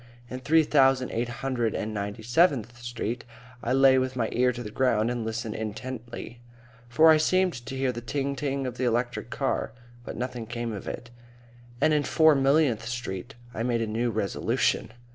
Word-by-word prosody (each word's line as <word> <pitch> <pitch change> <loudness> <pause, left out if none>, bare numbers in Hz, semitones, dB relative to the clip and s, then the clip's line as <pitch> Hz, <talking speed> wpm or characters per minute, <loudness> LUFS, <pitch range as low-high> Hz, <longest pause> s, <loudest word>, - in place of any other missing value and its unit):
In 130 - -4
Three 155 +5 +4
thousand 135 -3 +3
eight 120 +1 -1
hundred 120 -3 -2
and 110 +1 -3
ninety 100 +1 -4
seventh 120 - +2
Street 120 0 -4 0.4
I 120 - -1
lay 135 0 +6
with 130 0 -2
my 115 -3 0
ear 125 +1 +3
to 120 0 -6
the 105 - -7
ground 120 -2 +2
and 120 -2 -2
listened 110 0 -3
intently, 120 +2 -6 0.5
for 160 +7 +6
I 155 - +6
seemed 185 +3 +2
to 135 - -5
hear 130 -1 +1
the 120 -1 -6
ting 140 +3 -2
ting 140 -1 -2
of 125 -1 -5
the 130 - -2
electric 120 +1 -1
car, - - -2 0.3
but - - -7
nothing 125 -2 -4
came 120 0 -4
of 100 - -7
it; 120 0 -6 0.7
and 155 +3 +3
in 150 - +3
Four 160 +1 +5
millionth 135 -4 +2
Street 120 -1 -5 0.2
I 115 - -4
made 115 -1 0
a - - 0
new 115 +3 -1
resolution. 110 0 0
120 Hz, 185 wpm, -27 LUFS, 115-135 Hz, 0.7 s, lay